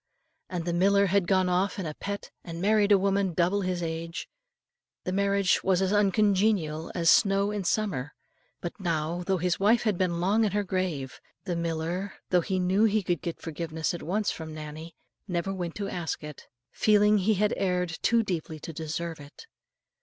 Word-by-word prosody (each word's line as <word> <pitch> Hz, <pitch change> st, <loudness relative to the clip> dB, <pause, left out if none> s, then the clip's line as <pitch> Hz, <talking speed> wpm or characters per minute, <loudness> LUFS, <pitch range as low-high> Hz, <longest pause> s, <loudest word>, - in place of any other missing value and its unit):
And 175 Hz, -3 st, -3 dB
the 175 Hz, -, -1 dB
miller 200 Hz, +3 st, +4 dB
had 195 Hz, -1 st, +2 dB
gone 185 Hz, -1 st, +3 dB
off 180 Hz, +2 st, +1 dB
in 190 Hz, -, -3 dB
a 155 Hz, -, -4 dB
pet, 200 Hz, +5 st, -6 dB
and 165 Hz, -1 st, -7 dB
married 205 Hz, +2 st, +3 dB
a 200 Hz, -, +8 dB
woman 195 Hz, -2 st, +1 dB
double 180 Hz, +4 st, +2 dB
his 180 Hz, -2 st, -2 dB
age. 165 Hz, +1 st, -4 dB, 0.8 s
The 185 Hz, -, -2 dB
marriage 200 Hz, 0 st, +2 dB
was 190 Hz, -2 st, +3 dB
as 190 Hz, +1 st, +1 dB
uncongenial 200 Hz, -5 st, +2 dB
as 170 Hz, -2 st, +4 dB
snow 200 Hz, 0 st, +4 dB
in 205 Hz, -3 st, -3 dB
summer; 170 Hz, -9 st, -1 dB, 0.5 s
but 175 Hz, -, -6 dB
now, 170 Hz, -1 st, -1 dB
though 190 Hz, +1 st, 0 dB
his 180 Hz, 0 st, 0 dB
wife 215 Hz, +4 st, +4 dB
had 210 Hz, -6 st, 0 dB
been 175 Hz, -2 st, 0 dB
long 200 Hz, +6 st, +2 dB
in 205 Hz, -3 st, 0 dB
her 205 Hz, 0 st, +1 dB
grave, 180 Hz, -9 st, -3 dB, 0.2 s
the 180 Hz, -3 st, -2 dB
miller, 170 Hz, +3 st, -2 dB, 0.2 s
though 180 Hz, -1 st, +4 dB
he 190 Hz, +1 st, -2 dB
knew 185 Hz, +4 st, +3 dB
he 215 Hz, -1 st, +2 dB
could 175 Hz, -3 st, -1 dB
get 170 Hz, -, -4 dB
forgiveness 160 Hz, 0 st, -3 dB
at 175 Hz, -, -5 dB
once 205 Hz, +5 st, 0 dB
from 160 Hz, -1 st, -7 dB
Nannie, 155 Hz, +2 st, -8 dB, 0.3 s
never 180 Hz, +1 st, -2 dB
went 175 Hz, -3 st, -4 dB
to 200 Hz, -1 st, -3 dB
ask 175 Hz, -6 st, -4 dB
it, 150 Hz, -2 st, -9 dB, 0.2 s
feeling 210 Hz, 0 st, +4 dB
he 210 Hz, +3 st, +2 dB
had 210 Hz, +2 st, +1 dB
erred 180 Hz, -3 st, -1 dB
too 230 Hz, 0 st, +3 dB
deeply 165 Hz, -5 st, -4 dB
to 165 Hz, -, -7 dB
deserve 160 Hz, +1 st, -4 dB
it. 145 Hz, -, -13 dB
180 Hz, 190 wpm, -28 LUFS, 165-200 Hz, 0.8 s, a